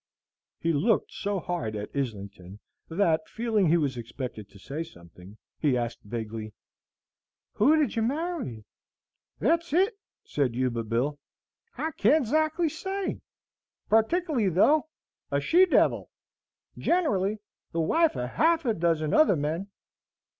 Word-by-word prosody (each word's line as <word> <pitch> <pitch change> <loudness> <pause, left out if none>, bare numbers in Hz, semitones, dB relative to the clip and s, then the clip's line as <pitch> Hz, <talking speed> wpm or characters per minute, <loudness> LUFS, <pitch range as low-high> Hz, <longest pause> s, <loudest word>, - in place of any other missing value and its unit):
He 165 0 0
looked 210 +10 +1
so 200 -1 -2
hard 125 -12 -3
at 105 0 -5
Islington, 100 -7 -5 0.3
that, 165 -2 +1
feeling 220 -4 +1
he 165 +2 +4
was 140 -6 -1
expected 120 -3 -6
to - - -16
say 140 +10 -6
something, 90 - -15 0.2
he 140 -5 +2
asked 120 -1 -3
vaguely, 110 -1 -6 1.0
"Who 275 +9 +4
did 300 -4 +1
you 225 - +1
marry?" 270 - -2 0.7
"Thet's 330 - +1
it!" 385 +7 +3 0.3
said 135 -5 -1
Yuba 120 -2 -1
Bill; 125 +6 -1 0.6
"I 320 +1 -2
can't 285 +3 +3
ezactly 310 +6 +1
say; 385 +4 -4 0.7
partikly, 235 - +2
though, 285 - +4 0.4
a 140 - +1
she 355 - +4
devil! - - +2 0.7
generally, 215 - +1 0.3
the 165 - 0
wife 325 - +2
of 125 - -2
half 325 - +2
a 230 - +2
dozen 165 -4 0
other 310 - +5
men." 160 +6 -2
170 Hz, 130 wpm, -27 LUFS, -, 1.0 s, other